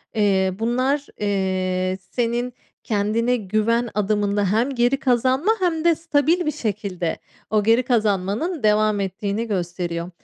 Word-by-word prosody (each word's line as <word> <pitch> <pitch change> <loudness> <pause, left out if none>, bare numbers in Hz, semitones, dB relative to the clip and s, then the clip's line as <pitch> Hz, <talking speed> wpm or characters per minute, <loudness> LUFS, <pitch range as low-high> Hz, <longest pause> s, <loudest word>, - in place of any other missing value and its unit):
eee, 190 -3 +2
bunlar, 255 +5 0
eee, 185 -2 -1
senin 240 +1 -1 0.3
kendine 220 +3 +1
güven 220 +3 0
adımında 205 0 +1
hem 230 +5 +2
geri 245 +3 +2
kazanma 260 - +2
hem 335 -4 0
de 340 -1 +5
stabil 330 +2 +1
bir 305 - +1
şekilde 200 - -3 0.3
o 215 -1 +2
geri 230 +4 +4
kazanmanın 225 - 0
devam 215 0 +3
ettiğini 200 +3 -2
gösteriyor. 175 -3 -3
215 Hz, 125 wpm, -22 LUFS, 200-250 Hz, 0.3 s, de